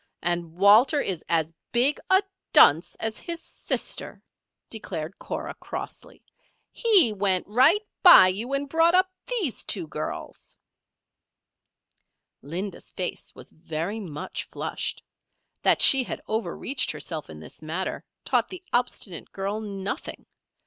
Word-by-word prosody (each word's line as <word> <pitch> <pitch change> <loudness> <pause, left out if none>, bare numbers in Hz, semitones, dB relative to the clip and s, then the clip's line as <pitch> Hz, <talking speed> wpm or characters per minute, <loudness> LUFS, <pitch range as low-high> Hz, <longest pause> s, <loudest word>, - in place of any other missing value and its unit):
And 170 -1 -2
Walter 215 - +5
is 185 - -2
as 165 -1 +1 0.2
big 255 +5 +2
a 380 +1 +5 0.3
dunce 160 +5 +6
as 220 0 -3
his 340 -1 -5
sister," - - -4 0.4
declared 190 -6 -6
Cora, - - -5
crossly. - - -9 0.5
"He 395 - +5
went 190 -2 +1
right 275 - +4 0.2
by 350 - +9
you 215 +8 -4
and 280 +1 -1
brought 330 +4 +3
up 370 0 +3 0.2
these 410 - 0
two 185 -5 0
girls." 155 0 -7 1.9
Linda's 175 +7 -6
face 180 - -5
was - - -13
very 165 +7 -5
much 155 -8 -6
flushed. - - -5 0.6
That - - +4
she 270 - +8
had - - -6
overreached 230 +4 -2
herself 155 - -5
in 75 -1 -10
this 80 - -12
matter, 165 +4 -4 0.2
taught - - +1
the 370 -1 -9
obstinate 240 -7 -2
girl 195 +2 -3
nothing. 200 - -6
205 Hz, 125 wpm, -25 LUFS, 170-275 Hz, 1.9 s, by